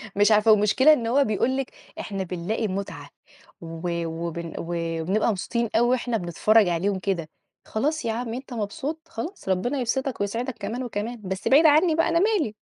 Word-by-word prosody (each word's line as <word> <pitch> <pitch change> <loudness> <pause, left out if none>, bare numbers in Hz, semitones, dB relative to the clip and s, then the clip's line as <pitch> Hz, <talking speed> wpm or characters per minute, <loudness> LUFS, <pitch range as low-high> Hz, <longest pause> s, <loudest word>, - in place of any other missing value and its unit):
مش 205 +2 +4
عارفة. 215 +1 +5
والمشكلة 215 +8 +5
إن 230 -6 -1
هو 275 +4 +3
بيقول 240 +4 0
لِك 270 - -3 0.3
إحنا 195 -2 -4
بنلاقي 185 +5 -2
مُتعة 195 +1 -5 0.5
و 170 +1 -4
وبن 170 0 -5
وبنبقى 170 +5 -1
مبسوطين 230 +4 -2
أوي 240 +1 +4
وإحنا 245 -2 0
بنتفرّج 205 +4 +3
عليهم 190 +3 0
كده، 175 -5 -2 0.4
خلاص 295 +6 -1
يا 225 - 0
عم 230 0 -4
أنت 255 0 -7
مبسوط، 265 +9 -4
خلاص، 320 - -7
ربنا 240 +10 0
يبسِطك 260 0 -2
ويسعِدك 235 +5 -2
كمان 230 +6 -4
وكمان، 230 0 -4
بس 190 +1 -4
بعيد 300 +4 +6
عني 310 +2 +5
بقى، 330 +1 +2
أنا 335 0 +2
مالي! 385 - +1
220 Hz, 170 wpm, -25 LUFS, 190-260 Hz, 0.5 s, بعيد